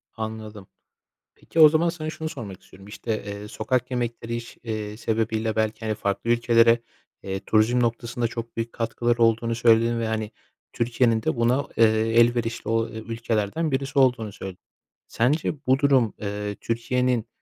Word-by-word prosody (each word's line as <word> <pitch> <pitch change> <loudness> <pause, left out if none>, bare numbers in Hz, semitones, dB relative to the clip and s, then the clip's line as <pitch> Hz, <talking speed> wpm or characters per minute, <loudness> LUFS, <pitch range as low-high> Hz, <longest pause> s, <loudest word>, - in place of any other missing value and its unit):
Anladım. 110 -3 -6 0.7
Peki, 165 - -5
o 155 -1 +10
zaman 160 +2 +2
sana 160 -2 -4
şunu 160 0 -5
sormak 110 - -8
istiyorum. 95 +1 -16
İşte, 110 +1 -4
eee, 100 0 -6
sokak 125 +4 -2
yemekleri 120 -1 -3
iş 120 0 -8
eee, 110 -2 -4
sebebiyle 110 -1 -1
belki, 110 0 -1
hani, 110 -1 -1
farklı 100 +3 -2
ülkelere, 115 0 +4 0.4
eee, 95 0 -3
turizm 110 +3 +3
noktasında 120 0 -1
çok 115 0 -7
büyük 115 0 -3
katkıları 120 +1 -1
olduğunu 115 0 +2
söyledin 115 0 +3
ve, 115 - -1
hani, 110 -1 -2 0.4
Türkiye'nin 115 -1 +1
de - - 0
buna, 125 +4 +2
eee, 115 - +6 0.4
elverişli 120 -1 +1
o 115 0 +1
ülkelerden 115 +5 -2
birisi 135 +1 0
olduğunu 125 -5 +2
söyledin. 95 -2 -8 0.5
Sence 140 +7 +1
bu 130 +1 +4
durum, 135 -6 +3
eee, 105 0 -3
Türkiye'nin 120 0 0
115 Hz, 150 wpm, -24 LUFS, 110-120 Hz, 0.7 s, o